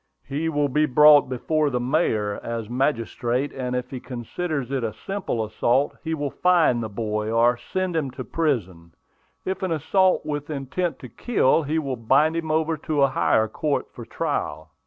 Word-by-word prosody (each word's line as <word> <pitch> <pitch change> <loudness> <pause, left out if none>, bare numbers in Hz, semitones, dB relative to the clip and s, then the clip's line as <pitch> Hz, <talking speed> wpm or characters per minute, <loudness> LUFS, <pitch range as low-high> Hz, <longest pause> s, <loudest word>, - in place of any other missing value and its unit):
"He 150 +4 -2
will 145 -2 +1
be 150 +3 +2
brought 150 +1 +6
before 150 +4 0
the 125 -2 -1
mayor, 120 -6 0
as 115 -2 -4
magistrate; 125 +1 -1
and 125 -1 -3
if 125 0 -4
he 130 - -5
considers 135 +3 -4
it 135 -3 -1
a 110 -2 -2
simple 120 - -3
assault, 120 +5 +1
he 160 0 -2
will 145 -2 -3
fine 170 -9 +3
the 110 - -4
boy, 105 0 -3
or 120 +2 +4
send 180 +9 -3
him 150 -4 0
to 130 - -4
prison; 95 - -2 0.5
if 190 0 -3
an 190 -2 -1
assault 185 +5 +2
with 145 -1 -4
intent 155 +5 -2
to 130 - -8
kill, 165 - +2
he 155 +1 -2
will 135 -5 -2
bind 140 +8 +3
him 165 -1 -3
over 160 +1 +1
to 150 -1 0
a 140 - +4
higher 110 -4 +2
court 145 +6 -2
for - - -9
trial." 80 +1 -3
135 Hz, 180 wpm, -24 LUFS, 120-155 Hz, 0.5 s, brought